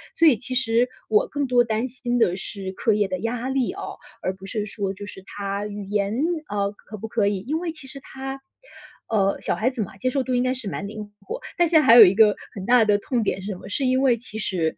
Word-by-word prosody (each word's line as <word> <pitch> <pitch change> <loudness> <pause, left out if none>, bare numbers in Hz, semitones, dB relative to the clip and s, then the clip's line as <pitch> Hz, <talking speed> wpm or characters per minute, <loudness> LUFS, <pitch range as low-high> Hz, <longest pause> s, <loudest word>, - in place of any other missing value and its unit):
所 335 - +4
以 290 -8 +6
其 255 +2 -5
实 245 -1 +3 0.2
我 215 -1 +3
更 285 -1 -2
多 250 -2 +4
担 230 +1 -1
心 245 0 -2
的 185 -6 +2
是 195 -1 -6
课 215 +3 +1
业 205 -2 +1
的 185 -1 -2
压 235 +4 -2
力 265 +3 0
哦， 395 - -7 0.2
而 185 - -1
不 190 0 -12
是 205 +2 -3
说 200 -2 -3
就 205 +1 -8
是 195 - -10
她 200 +1 -4
语 205 0 -6
言， 205 0 0 0.3
啊， 200 -3 -1
可 215 +1 -11
不 225 +2 -7
可 220 -3 +1
以。 200 -1 0
因 300 +10 -2
为 345 -1 -3
其 315 - -10
实 275 +1 -7
她， 270 0 -7 0.7
呃， 200 -3 +1
小 - - 0
孩 230 - +1
子 255 -3 -4
嘛， 190 -1 -6
接 255 +6 0
受 270 +1 0
度 255 - -2
应 245 - +2
该 255 0 +1
是 250 -6 -3
蛮 200 - -4
灵 210 0 -8
活， 340 - -6 0.2
但 345 -1 +4
现 320 -1 +5
在 - - -1
还 230 - +8
有 235 - +12
一 185 - +4
个 210 -1 +6 0.2
很 195 -2 -6
大 240 0 +5
的 205 -1 +4
痛 240 +2 -1
点 195 - -1
是 190 - -7
什 - - -4
么？ - - -11
是 270 +6 -1
因 255 +1 +2
为 260 -3 +4
其 225 -2 -8
实， 180 -7 -1
220 Hz, 285 characters per minute, -24 LUFS, 200-255 Hz, 0.7 s, 有